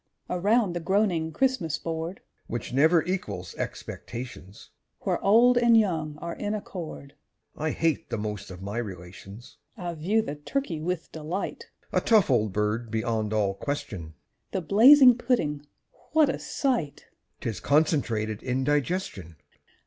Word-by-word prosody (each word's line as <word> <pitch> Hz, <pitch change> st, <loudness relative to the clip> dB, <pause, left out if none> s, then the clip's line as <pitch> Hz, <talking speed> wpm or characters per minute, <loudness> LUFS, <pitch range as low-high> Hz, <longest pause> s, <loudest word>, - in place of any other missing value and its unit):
_) -, -, -1 dB
Around 205 Hz, +1 st, +2 dB
the 175 Hz, -, -2 dB
groaning 175 Hz, -2 st, +1 dB
Christmas 255 Hz, -, 0 dB
board, 165 Hz, +3 st, -5 dB, 0.3 s
(Which 120 Hz, +1 st, -5 dB
never 160 Hz, +4 st, +4 dB
equals 100 Hz, -, -4 dB
expectations,) 115 Hz, -6 st, -7 dB, 0.3 s
Where -, -, -1 dB
old 240 Hz, +4 st, +6 dB
and 235 Hz, -1 st, +5 dB
young 160 Hz, -8 st, 0 dB
are 170 Hz, +2 st, -5 dB
in 205 Hz, +1 st, -3 dB
accord 165 Hz, -8 st, -7 dB, 0.4 s
(I 155 Hz, +1 st, -2 dB
hate 160 Hz, -1 st, 0 dB
the -, -, -2 dB
most 105 Hz, -2 st, -5 dB
of 90 Hz, 0 st, -9 dB
my 100 Hz, +4 st, -3 dB
relations!) 95 Hz, +1 st, -9 dB, 0.2 s
I 175 Hz, -3 st, -4 dB
view 195 Hz, +8 st, +1 dB
the 145 Hz, -, -4 dB
turkey 165 Hz, -, -3 dB
with 180 Hz, +1 st, -3 dB
delight, 160 Hz, +5 st, -5 dB, 0.2 s
(A -, -, +3 dB
tough 215 Hz, -10 st, +4 dB
old 110 Hz, -5 st, +2 dB
bird 105 Hz, +3 st, -1 dB
beyond 110 Hz, -1 st, -1 dB
all 105 Hz, -3 st, +1 dB
question!) 95 Hz, -, -5 dB, 0.4 s
The 190 Hz, -, 0 dB
blazing 245 Hz, -, +7 dB
pudding 150 Hz, -, 0 dB, 0.5 s
what 310 Hz, -3 st, +5 dB
a -, -, -2 dB
sight! 240 Hz, -, -2 dB, 0.4 s
(_'Tis 115 Hz, -, -4 dB
concentrated 120 Hz, -8 st, +1 dB
indigestion! 130 Hz, -, -1 dB
155 Hz, 140 wpm, -27 LUFS, -, 0.5 s, blazing